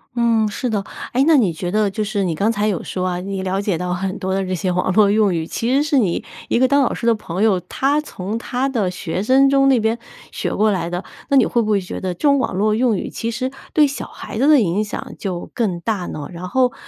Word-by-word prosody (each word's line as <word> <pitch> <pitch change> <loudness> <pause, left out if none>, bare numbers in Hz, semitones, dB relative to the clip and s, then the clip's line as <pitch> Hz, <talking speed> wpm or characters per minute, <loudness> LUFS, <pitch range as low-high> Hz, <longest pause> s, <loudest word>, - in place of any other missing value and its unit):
嗯， 230 -2 +3
是 250 +4 -3
的。 205 -3 -1 0.3
诶， 260 +3 +3
那 320 -1 +6
你 200 -10 +2
觉 175 +2 -4
得 210 0 +2
就 205 +2 -2
是 205 -2 -1
你 170 -3 -1
刚 205 +8 +1
才 210 -2 0
有 195 -6 -1
说 185 0 -3
啊， 180 -1 -2
你 195 0 -4
了 190 +1 -1
解 200 -4 -1
到 180 +1 -2
很 185 +1 -3
多 190 0 -2
的 195 0 0
这 185 - -3
些 185 +1 -1
网 180 +1 0
络 205 +1 +5
用 205 -2 +3
语， 165 -1 -2
其 235 +7 -1
实 275 - +4
是 295 -1 +1
你 195 -9 +1 0.2
一 - - +2
个 260 - +5
当 280 +2 +3
老 265 - +1
师 235 - -3
的 230 - +5
朋 195 -2 -3
友， 200 -5 +3
他 280 - 0
从 205 -7 -5
他 250 +3 -2
的 220 -9 0
学 180 0 -3
生 265 +4 +5
中 275 0 +4
那 260 -3 +4
边 220 +1 0 0.4
学 - - -2
过 215 +1 +2
来 185 -3 -1
的。 175 +2 -4 0.2
那 280 - +4
你 - - +6
会 235 - +1
不 215 -1 -1
会 205 - +3
觉 185 - -6
得 185 -1 -2
这 175 - -19
种 280 0 +5
网 - - -1
络 210 +2 +2
用 230 -2 +2
语 - - -4
其 230 0 -3
实 255 +3 -2 0.2
对 300 -2 +4
小 280 - -5
孩 - - -8
子 270 +6 +3
的 300 -2 +7
影 200 -1 +1
响 210 - -6
就 180 -4 -5
更 195 -7 -1
大 195 -1 -2
呢？ 145 -2 -6
然 180 +2 -6
后 250 +1 +2
210 Hz, 290 characters per minute, -20 LUFS, 185-245 Hz, 0.4 s, 的